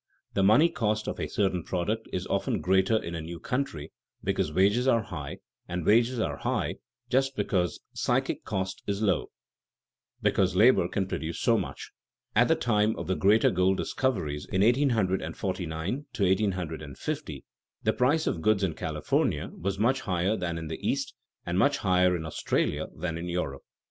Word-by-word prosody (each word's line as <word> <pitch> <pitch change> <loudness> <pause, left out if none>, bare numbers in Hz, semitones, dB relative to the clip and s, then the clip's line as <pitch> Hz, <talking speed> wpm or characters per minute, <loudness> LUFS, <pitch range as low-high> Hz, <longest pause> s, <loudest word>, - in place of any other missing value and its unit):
The 100 - +1
money 110 +12 +6
cost 110 -9 -1
of - - -3
a - - -2
certain 95 -4 0
product 105 +7 -2
is 90 0 -2
often - - 0
greater 95 +4 +3
in 85 -5 -4
a 85 - -3
new 85 +2 -7
country 80 - -3 0.3
because 75 - 0
wages 100 +9 +3
are 115 -4 +4
high, 75 -8 -6 0.3
and 90 -1 -3
wages 120 +3 +4
are 75 -9 -1
high - - -1 0.3
just 135 +1 +1
because 90 -6 0
psychic - - 0
cost 95 0 -3
is 100 +1 -1
low, 100 -3 +1 0.9
that - - +5
is, - - -3
because 95 -2 +2
labor 105 -3 +5
can 95 +1 -1
produce 80 -3 -4
so - - +3
much. - - -4 0.4
At - - +5
the - - +4
time 110 -2 +1
of - - -5
the 95 - 0
great 105 +4 +4
gold 95 +1 +2
discoveries 85 - -1
in 95 +1 +2
1849 95 - 0
50, - - -5 0.4
the - - +2
price 145 +6 +2
of 80 - -1
goods 105 +1 +2
in 90 -4 +1
California - - -1
was 100 +2 -3
much 125 +6 +2
higher 95 +2 0
than 85 -4 -3
in 80 -1 -5
the 80 - -5
East, - - -1 0.3
and 90 +2 0
much 140 +4 +3
higher 90 -2 +3
in 80 -2 -4
Australia 80 - -1
than 85 -2 -3
in 90 +1 -5
Europe. 70 -6 -3
95 Hz, 170 wpm, -28 LUFS, 85-110 Hz, 0.9 s, money